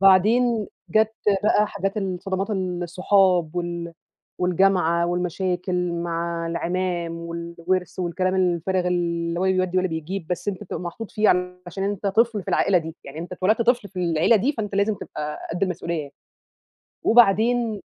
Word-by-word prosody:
بعدين 215 Hz, +4 st, +4 dB, 0.2 s
جات 220 Hz, +2 st, +3 dB, 0.3 s
بقى 210 Hz, 0 st, +4 dB
حاجات 195 Hz, +1 st, -3 dB
الصدمات 190 Hz, +1 st, -2 dB
الصحاب، 180 Hz, -2 st, +1 dB
وال 170 Hz, -1 st, -3 dB, 0.5 s
والجامعة، 180 Hz, -2 st, +2 dB
والمشاكل 180 Hz, 0 st, -1 dB
مع 170 Hz, 0 st, -2 dB
العمام، 170 Hz, 0 st, -2 dB
والوِرث، 170 Hz, +2 st, -3 dB
والكلام 185 Hz, +1 st, 0 dB
الفارغ 180 Hz, 0 st, +1 dB
اللي 170 Hz, -1 st, -1 dB
هو -, -, +1 dB
لا 190 Hz, -, +3 dB
بيودي 185 Hz, 0 st, +1 dB
ولا 185 Hz, -, +1 dB
بيجيب، 160 Hz, +2 st, -4 dB
بس 180 Hz, +3 st, -3 dB
أنت 190 Hz, -3 st, -3 dB
بتبقى -, -, -5 dB
محطوط 185 Hz, +5 st, -6 dB
فيه 215 Hz, 0 st, +2 dB, 0.4 s
علشان 195 Hz, +3 st, -4 dB
أنت 200 Hz, 0 st, -2 dB
طفل 220 Hz, 0 st, +2 dB
في -, -, -12 dB
العائلة 190 Hz, -2 st, +3 dB
دي، 160 Hz, 0 st, -7 dB
يعني 140 Hz, +3 st, -9 dB
أنت 175 Hz, +2 st, -6 dB
اتولدت 210 Hz, +6 st, +2 dB
طفل 240 Hz, -3 st, +2 dB
في 190 Hz, -, -9 dB
العيلة 170 Hz, +5 st, +3 dB
دي 255 Hz, +9 st, +1 dB
فأنت 210 Hz, -5 st, -4 dB
لازم 200 Hz, +2 st, +2 dB
تبقى 150 Hz, -5 st, -6 dB
قد 175 Hz, -, -4 dB
المسؤوليّة 170 Hz, -2 st, -1 dB
يعني. 145 Hz, -1 st, -10 dB, 0.9 s
وبعدين 230 Hz, 0 st, +4 dB
185 Hz, 150 wpm, -23 LUFS, 170-200 Hz, 0.9 s, بعدين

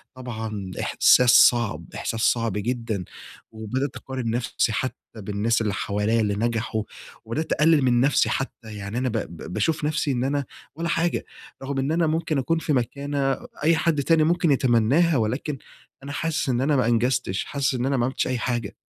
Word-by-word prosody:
طبعًا 110 Hz, -6 st, -6 dB
إحساس 125 Hz, -1 st, +4 dB
صعب، 120 Hz, -3 st, +4 dB
إحساس 115 Hz, -1 st, -3 dB
صعب 115 Hz, -4 st, +2 dB
جدًا، 110 Hz, -2 st, -2 dB, 0.5 s
وبدأت 115 Hz, +5 st, -3 dB
اقارن 130 Hz, -3 st, -4 dB
نفسي 115 Hz, -1 st, 0 dB
حتّى 130 Hz, +4 st, -2 dB, 0.2 s
بالناس 105 Hz, +3 st, 0 dB
اللي 105 Hz, -3 st, -1 dB
حواليّ 105 Hz, +4 st, 0 dB
اللي 105 Hz, -2 st, +1 dB
نجحوا، 115 Hz, 0 st, -1 dB, 0.4 s
وبدأت 145 Hz, +9 st, -3 dB
أقلل 155 Hz, -1 st, +4 dB
من 125 Hz, -2 st, +3 dB
نفسي 140 Hz, +3 st, +3 dB
حتّى، 115 Hz, -4 st, -4 dB
يعني 105 Hz, +2 st, -5 dB
أنا 130 Hz, 0 st, 0 dB
ب 115 Hz, -, -2 dB
ب 85 Hz, -3 st, -6 dB
باشوف 150 Hz, +9 st, 0 dB
نفسي 150 Hz, -1 st, 0 dB
إن 125 Hz, -2 st, -1 dB
أنا 140 Hz, +1 st, -1 dB, 0.3 s
والّا 170 Hz, +2 st, -3 dB
حاجة 170 Hz, +1 st, 0 dB, 0.4 s
رغم 135 Hz, 0 st, -3 dB
إن 135 Hz, +3 st, 0 dB
أنا 165 Hz, 0 st, +2 dB
ممكن 155 Hz, -1 st, 0 dB
أكون 150 Hz, +6 st, 0 dB
في 155 Hz, -, -1 dB
مكانة 140 Hz, +2 st, -1 dB, 0.3 s
أي 165 Hz, +2 st, +4 dB
حد 155 Hz, -3 st, +1 dB
تاني 165 Hz, +1 st, +4 dB
ممكن 170 Hz, 0 st, +2 dB
يتمناها، 135 Hz, +5 st, +3 dB
ولكن 125 Hz, +6 st, -2 dB, 0.5 s
أنا 140 Hz, -, -6 dB
حاسس 160 Hz, 0 st, -1 dB
إن 125 Hz, -1 st, +1 dB
أنا 145 Hz, +2 st, +2 dB
ما 130 Hz, -, +2 dB
أنجزتش، 120 Hz, -4 st, 0 dB
حاسس 140 Hz, -2 st, -1 dB
إن 125 Hz, -1 st, -1 dB
أنا 135 Hz, 0 st, +1 dB
ما 120 Hz, -, +1 dB
عملتش 130 Hz, -, -1 dB
أي 130 Hz, -, -1 dB
حاجة. 120 Hz, -4 st, -2 dB
125 Hz, 180 wpm, -24 LUFS, 115-145 Hz, 0.5 s, إحساس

